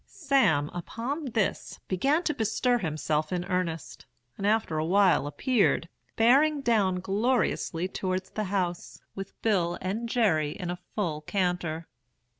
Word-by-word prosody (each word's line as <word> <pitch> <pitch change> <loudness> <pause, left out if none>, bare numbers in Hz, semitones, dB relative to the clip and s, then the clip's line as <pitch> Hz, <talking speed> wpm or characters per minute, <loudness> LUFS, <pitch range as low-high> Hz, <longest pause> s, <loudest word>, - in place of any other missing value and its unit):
"Sam, 245 - +2
upon 240 - -4
this, 215 -4 -1
began 275 - +1
to 305 - 0
bestir 245 +1 +1
himself 155 - -1
in 180 -1 -1
earnest, 180 -4 -3 0.3
and 200 - -2
after 210 -7 +1
a - - 0
while 185 -4 +4
appeared, 195 - +1 0.3
bearing 280 +6 +4
down 200 -7 +2
gloriously 195 -4 0
towards 185 0 -3
the 215 - -2
house, 185 -3 -2
with 195 -1 -8
Bill 175 -6 +1
and 215 +6 -3
Jerry 160 -12 +2
in 180 -3 -3
a 175 - -5 0.2
full 165 -8 -1
canter. 175 -2 -1
190 Hz, 135 wpm, -28 LUFS, 170-230 Hz, 0.3 s, while